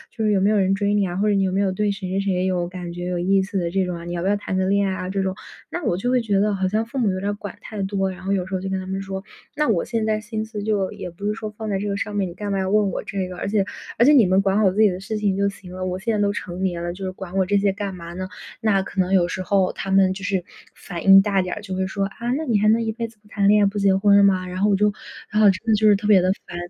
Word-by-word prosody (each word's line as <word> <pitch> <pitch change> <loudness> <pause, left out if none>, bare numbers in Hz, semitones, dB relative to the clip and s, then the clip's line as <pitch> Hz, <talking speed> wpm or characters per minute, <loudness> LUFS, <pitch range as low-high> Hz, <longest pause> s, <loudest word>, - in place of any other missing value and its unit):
就 225 - -2
是 215 - +2
有 200 - +3
没 195 +2 +3
有 215 - +3
人 190 -1 +2
追 200 +1 0
你 205 -1 +2
啊， 175 -1 -4
或 205 +2 +1
者 205 - +3
你 195 - +2
有 190 - 0
没 190 - 0
有 195 -2 +1
对 210 +2 0
谁 195 -2 -5
谁 195 +1 0
谁 185 -2 0
有 180 -2 0
感 180 -1 -7
觉、 175 0 -6
有 180 - -2
意 190 +2 +2
思 195 0 -3
的 170 - -1
这 190 +2 +1
种 180 -1 -4
啊？ 170 - -9
你 175 - -5
要 170 - -3
不 190 - 0
要 205 - +2
谈 195 - -4
个 185 0 +1
恋 200 0 +2
爱 190 - -1
啊？” 185 0 -5
这 195 0 -1
种， 190 0 -2 0.3
那 350 - -5
我 175 - 0
就 245 +6 -1
会 250 -1 +3
觉 205 -3 +1
得 205 0 +2
好 190 -1 -1
像 215 +3 0
父 235 +4 -8
母 230 -6 +2
有 185 - -3
点 200 +2 -2
儿 - - -1
管 205 -2 -8
太 210 -2 -6
多， 195 -1 -1
然 185 0 -10
后 195 - -2
有 185 -2 0
时 190 - -9
候 185 - -1
就 190 - -4
跟 190 0 -1
他 185 - -6
们 190 +1 -3
说： 190 0 -5 0.3
“那 300 - +2
我 200 -8 +2
现 230 -2 -2
在 215 -1 +1
心 220 0 -4
思 220 -2 -6
就 205 -3 0
也 180 - -7
不 175 +4 -9
是 210 - +1
说 215 0 -5
放 215 +1 -7
在 195 -2 0
这 205 - -3
个 200 - -1
上 205 +1 -4
面， 195 -3 0
你 - - -9
干 205 +1 -4
嘛 195 - 0
要 190 - -1
问 205 -1 +2
我 - - -4
这 195 -2 -3
个， 180 - -8
而 - - -3
且 200 -2 +1 0.3
而 235 - +5
且 295 - +7
你 255 -7 +7
们 185 +1 +3
管 195 0 +1
好 195 -3 +4
自 200 - -4
己 215 - +6
的 180 - -5
事 215 +3 -4
情 205 -2 0
就 200 +1 +1
行 185 -2 -12
了， 185 0 -5
我 180 0 -2
现 225 +4 -1
在 205 - 0
都 200 0 +2
成 180 -2 -6
年 175 -2 -1
了， 175 0 -3
就 195 - -9
是 185 - -2
管 185 0 -9
我 190 - +3
这 205 +1 +2
些 200 0 +2
干 200 -1 -4
嘛 170 -1 -9
呢？” 185 +1 -5 0.3
那 200 -3 +2
可 195 - -6
能 185 0 +1
有 180 -2 +4
时 185 - -4
候 190 0 +1
他 195 - -6
们 190 -1 +4
就 195 +1 -9
是 190 -3 -1 0.3
反 170 -3 -7
应 195 0 +9
大 200 -2 +1
点 180 -1 -3
儿， - - -7
就 190 -2 -5
会 190 0 -1
说： 195 +1 -2
“啊， 235 +4 -4
那 320 - -3
你 225 -7 +2
还 215 - +2
能 225 +1 +4
一 220 - -1
辈 230 +1 -4
子 225 -1 -20
不 210 - -24
谈 205 -1 0
恋 210 0 +5
爱， - - +5
不 205 +1 -3
结 195 -1 +3
婚 200 +1 +4
了 200 - +6
吗？” 190 -2 +3
然 180 +1 -5
后 205 - +3
我 200 - +4
就 210 +1 +2 0.4
然 210 - +2
后 210 - +7
真 195 +4 -1
的 225 - +3
就 215 0 +4
是 205 - +6
特 205 +1 -5
别 200 -4 +6
地 185 - +2 0.2
烦， - - -8
195 Hz, 385 characters per minute, -22 LUFS, 185-210 Hz, 0.4 s, 应